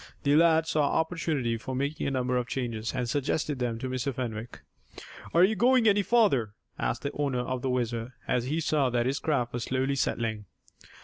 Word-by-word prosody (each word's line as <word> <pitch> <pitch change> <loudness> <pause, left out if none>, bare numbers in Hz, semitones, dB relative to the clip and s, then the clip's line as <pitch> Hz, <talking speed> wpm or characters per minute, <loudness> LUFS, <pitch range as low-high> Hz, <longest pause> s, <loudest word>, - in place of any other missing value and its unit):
The 145 0 +3
lad 160 0 +5
saw 155 -1 +1 0.2
opportunity 160 -8 -1
for 130 +3 -5
making 140 +3 -2
a - - +1
number 125 -2 -1
of 125 -1 0
changes, 115 -4 -3
and 125 -2 -1
suggested 145 +2 -1
them 120 -2 -1
to 130 - -4
Mr. 130 +1 -2
Fenwick. 120 -2 -5 0.7
"Are 170 - +5
you 210 +4 +4
going 245 +2 +4
any 205 -1 +5
farther?" 185 - +2 0.2
asked - - -2
the 140 - -2
owner 140 -4 -1
of 125 0 -3
the 130 - -1
WHIZZER, 120 -1 -2 0.2
as 125 -1 +1
he 155 +5 -1
saw 145 -4 +1
that 120 -1 0
his 135 +2 0
craft 125 -6 -1
was 120 -1 -3
slowly 130 +1 0
settling. 115 -5 -1
130 Hz, 195 wpm, -28 LUFS, 120-155 Hz, 0.7 s, lad